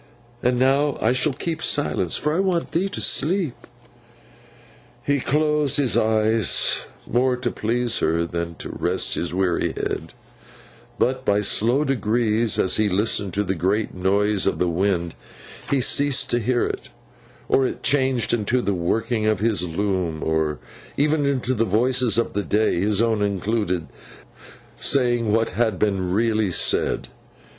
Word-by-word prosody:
And 125 Hz, 0 st, +1 dB
now 135 Hz, +3 st, +2 dB
I 110 Hz, -, +2 dB
shall 130 Hz, +4 st, +2 dB
keep 160 Hz, +4 st, -4 dB
silence, 95 Hz, -, 0 dB
for 150 Hz, +1 st, -1 dB
I 170 Hz, -, 0 dB
want 185 Hz, -3 st, 0 dB
thee 185 Hz, +4 st, 0 dB
to 205 Hz, -, -4 dB
sleep.' 165 Hz, -1 st, 0 dB, 1.4 s
He 145 Hz, 0 st, +1 dB
closed 150 Hz, +1 st, +1 dB
his 135 Hz, -5 st, +2 dB
eyes, 110 Hz, -2 st, +2 dB, 0.3 s
more 125 Hz, +1 st, +1 dB
to 125 Hz, -1 st, -2 dB
please 120 Hz, +1 st, 0 dB
her 85 Hz, +1 st, +1 dB
than 85 Hz, 0 st, -4 dB
to -, -, -8 dB
rest -, -, 0 dB
his 85 Hz, -, -2 dB
weary 90 Hz, -1 st, 0 dB
head; -, -, -4 dB, 0.8 s
but, 130 Hz, +1 st, 0 dB
by 105 Hz, -4 st, +2 dB
slow 115 Hz, +7 st, +2 dB
degrees 115 Hz, -4 st, 0 dB
as 95 Hz, -, +1 dB
he 110 Hz, -1 st, +2 dB
listened 100 Hz, 0 st, 0 dB
to 105 Hz, -, +1 dB
the 95 Hz, -1 st, -1 dB
great 95 Hz, +5 st, -1 dB
noise 100 Hz, +2 st, +1 dB
of -, -, 0 dB
the 90 Hz, -, 0 dB
wind, 85 Hz, -1 st, -1 dB, 0.6 s
he 140 Hz, -, +2 dB
ceased 140 Hz, +1 st, +2 dB
to 120 Hz, -, +2 dB
hear 120 Hz, +2 st, 0 dB
it, -, -, -5 dB, 0.6 s
or 135 Hz, -1 st, +2 dB
it -, -, -7 dB
changed 130 Hz, -5 st, +1 dB
into 120 Hz, +2 st, +1 dB
the 100 Hz, -, 0 dB
working 110 Hz, +5 st, -1 dB
of 110 Hz, -3 st, +1 dB
his 105 Hz, -5 st, +1 dB
loom, 90 Hz, -3 st, -2 dB
or 80 Hz, -2 st, 0 dB, 0.4 s
even 145 Hz, 0 st, +1 dB
into 130 Hz, -2 st, 0 dB
the 115 Hz, -2 st, +1 dB
voices 120 Hz, +3 st, +2 dB
of 115 Hz, -, 0 dB
the 105 Hz, -, -1 dB
day 105 Hz, -2 st, 0 dB
(his 105 Hz, +3 st, +1 dB
own 110 Hz, -2 st, 0 dB
included) 100 Hz, -3 st, -1 dB, 0.9 s
saying 120 Hz, -5 st, +1 dB
what 115 Hz, +1 st, +1 dB
had 110 Hz, -5 st, 0 dB
been 95 Hz, -3 st, -1 dB
really 110 Hz, 0 st, +1 dB
said. 90 Hz, -, +1 dB
110 Hz, 155 wpm, -22 LUFS, 100-130 Hz, 1.4 s, now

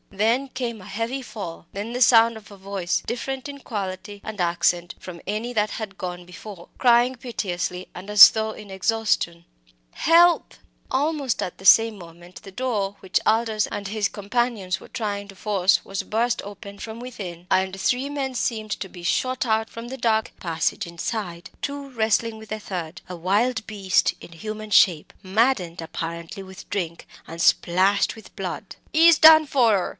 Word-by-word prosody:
Then 230 Hz, +7 st, +1 dB
came 235 Hz, -5 st, -4 dB
a -, -, -12 dB
heavy 230 Hz, +7 st, -3 dB
fall 195 Hz, -9 st, -8 dB
then 210 Hz, +4 st, -5 dB
the 250 Hz, -, -3 dB
sound 230 Hz, -1 st, +6 dB
of 220 Hz, -1 st, -12 dB
a 200 Hz, -, -12 dB
voice, 190 Hz, -2 st, -2 dB
different 265 Hz, +3 st, -4 dB
in 280 Hz, 0 st, -8 dB
quality 205 Hz, -3 st, -5 dB
and 215 Hz, -3 st, -4 dB
accent 175 Hz, 0 st, +1 dB
from 175 Hz, -2 st, -9 dB
any 220 Hz, +4 st, -3 dB
that 215 Hz, -2 st, +1 dB
had 205 Hz, -3 st, -6 dB
gone 180 Hz, -1 st, -6 dB
before, 180 Hz, 0 st, -11 dB
crying 245 Hz, +1 st, +4 dB
piteously 185 Hz, -7 st, -4 dB
and 185 Hz, +3 st, -9 dB
as 210 Hz, 0 st, +10 dB
though 220 Hz, 0 st, -2 dB
in 210 Hz, -2 st, -11 dB
exhaustion 190 Hz, -4 st, 0 dB, 0.5 s
"Help!" 340 Hz, +2 st, +4 dB, 0.3 s
Almost 280 Hz, -2 st, 0 dB
at 180 Hz, -, -5 dB
the 190 Hz, -, -12 dB
same 225 Hz, +2 st, +6 dB
moment 175 Hz, +1 st, -13 dB
the 195 Hz, -, -10 dB
door 205 Hz, -4 st, -2 dB
which 190 Hz, -, 0 dB
Aldous 220 Hz, -1 st, +2 dB
and 200 Hz, -1 st, -5 dB
his 210 Hz, 0 st, -1 dB
companions 205 Hz, -4 st, -1 dB
were -, -, -12 dB
trying 205 Hz, -3 st, -3 dB
to 195 Hz, -, -11 dB
force 190 Hz, -3 st, +2 dB
was 195 Hz, -1 st, -4 dB
burst 235 Hz, +2 st, 0 dB
open 200 Hz, 0 st, -10 dB
from 225 Hz, 0 st, -7 dB
within, 190 Hz, -9 st, -8 dB
and 190 Hz, 0 st, +1 dB
three 255 Hz, +7 st, 0 dB
men 275 Hz, -2 st, -3 dB
seemed 220 Hz, -2 st, -2 dB
to 195 Hz, -, -4 dB
be 175 Hz, -1 st, -12 dB
shot 255 Hz, +8 st, 0 dB
out 220 Hz, -1 st, +1 dB
from 230 Hz, +1 st, -8 dB
the 265 Hz, +2 st, -6 dB
dark 220 Hz, -3 st, +1 dB
passage 165 Hz, +3 st, -1 dB
inside 170 Hz, 0 st, -5 dB
two 280 Hz, -1 st, -4 dB
wrestling 225 Hz, -1 st, 0 dB
with 220 Hz, 0 st, -12 dB
the 215 Hz, -, -3 dB
third, 175 Hz, -4 st, -6 dB
a 180 Hz, -, -6 dB
wild 210 Hz, +7 st, 0 dB
beast 200 Hz, -3 st, +1 dB
in 170 Hz, -, -12 dB
human 215 Hz, +4 st, -7 dB
shape, 170 Hz, -6 st, +4 dB
maddened 190 Hz, -4 st, +1 dB
apparently 170 Hz, +3 st, -6 dB
with 190 Hz, 0 st, -12 dB
drink, 170 Hz, -5 st, -4 dB, 0.2 s
and 165 Hz, +1 st, -6 dB
splashed 190 Hz, +3 st, +3 dB
with 220 Hz, -, -14 dB
blood. -, -, -5 dB, 0.2 s
"Ee's 325 Hz, 0 st, +7 dB
done 315 Hz, 0 st, +9 dB
for 255 Hz, -5 st, +3 dB
her!" 195 Hz, -4 st, +1 dB
210 Hz, 175 wpm, -24 LUFS, 185-235 Hz, 0.5 s, as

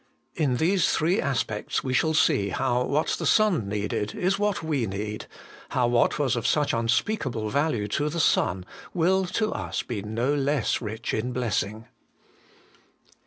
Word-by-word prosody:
In 135 Hz, -5 st, 0 dB
these 180 Hz, +5 st, +2 dB
three 175 Hz, +7 st, +2 dB
aspects 120 Hz, -6 st, -1 dB
we 130 Hz, -, -2 dB
shall 160 Hz, +4 st, +2 dB
see 100 Hz, -8 st, +3 dB
how 125 Hz, +4 st, 0 dB
what 150 Hz, +2 st, 0 dB
the -, -, -3 dB
Son 180 Hz, -, +3 dB
needed 105 Hz, 0 st, -2 dB
is 190 Hz, +2 st, 0 dB
what 205 Hz, -4 st, 0 dB
we 145 Hz, -8 st, 0 dB
need, 105 Hz, +2 st, -5 dB, 0.4 s
how 125 Hz, -, +1 dB
what 120 Hz, 0 st, +2 dB
was 135 Hz, -4 st, +1 dB
of 120 Hz, -, -1 dB
such 150 Hz, -2 st, +2 dB
unspeakable 115 Hz, -, 0 dB
value 140 Hz, -8 st, 0 dB
to 145 Hz, +7 st, 0 dB
the 170 Hz, +3 st, -3 dB
Son 90 Hz, -, +2 dB, 0.3 s
will 185 Hz, +3 st, +2 dB
to 215 Hz, +4 st, -1 dB
us -, -, -3 dB
be 110 Hz, -5 st, -4 dB
no 115 Hz, +7 st, -1 dB
less 140 Hz, -3 st, 0 dB
rich 110 Hz, 0 st, -4 dB
in 125 Hz, +3 st, -1 dB
blessing. 110 Hz, -2 st, -2 dB
125 Hz, 160 wpm, -26 LUFS, 110-160 Hz, 0.4 s, see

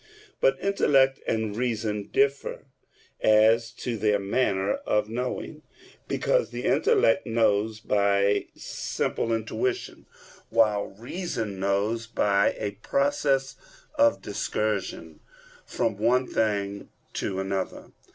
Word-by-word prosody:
But 135 Hz, 0 st, +3 dB
intellect 135 Hz, -9 st, +3 dB
and 110 Hz, -2 st, -1 dB
reason 110 Hz, -3 st, -2 dB
differ 140 Hz, 0 st, 0 dB, 0.6 s
as 110 Hz, +2 st, +4 dB
to 120 Hz, -2 st, -4 dB
their 105 Hz, 0 st, +2 dB
manner 100 Hz, -1 st, 0 dB
of 105 Hz, 0 st, 0 dB
knowing; 125 Hz, +6 st, -4 dB, 0.5 s
because -, -, +1 dB
the -, -, -6 dB
intellect 410 Hz, -, +3 dB
knows 110 Hz, -1 st, +1 dB
by 100 Hz, -1 st, +2 dB
simple 115 Hz, -, -3 dB
intuition, 370 Hz, -, -2 dB, 0.4 s
while 105 Hz, -3 st, +2 dB
reason 115 Hz, -, -5 dB
knows 100 Hz, +4 st, 0 dB
by 100 Hz, -3 st, +2 dB
a 105 Hz, -2 st, -4 dB
process 140 Hz, 0 st, +1 dB, 0.4 s
of 290 Hz, -1 st, +3 dB
discursion 100 Hz, -6 st, -3 dB, 0.5 s
from 110 Hz, -3 st, -1 dB
one 125 Hz, +4 st, +3 dB
thing 100 Hz, -4 st, -1 dB, 0.2 s
to 95 Hz, -1 st, -2 dB
another. 95 Hz, 0 st, -4 dB
110 Hz, 105 wpm, -26 LUFS, 100-130 Hz, 0.6 s, as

